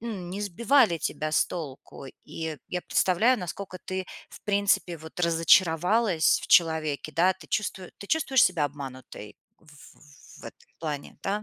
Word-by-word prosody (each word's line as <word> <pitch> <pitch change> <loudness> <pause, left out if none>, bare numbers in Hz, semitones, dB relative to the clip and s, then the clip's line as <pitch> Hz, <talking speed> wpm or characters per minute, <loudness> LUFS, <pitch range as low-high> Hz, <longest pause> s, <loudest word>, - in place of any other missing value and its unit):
м, 205 -7 -6
не 195 +3 -5
сбивали 210 0 +2
тебя 155 0 -3
с - - +3
толку. 140 -4 -8 0.2
И 160 -2 -5
я 180 - -3
представляю, 220 +8 +2
насколько 185 +1 -7
ты, 185 0 -4 0.2
в - - -13
принципе 200 -4 +1
вот, 160 +1 -12
разочаровалась 170 +3 +3
в - - -6
человеке, 160 -3 +2
да, 180 +5 +3
ты 180 -4 -16
чувству 205 -3 -2
ты 200 - -9
чувствуешь 270 -4 +3
себя 175 -5 +1
обманутой 130 -6 -8 0.2
в - - -28
ф 145 -1 -18
в - - -12
этом - - -13
плане, 150 -3 -6
да? 205 +2 -2
175 Hz, 160 wpm, -26 LUFS, 155-200 Hz, 0.2 s, с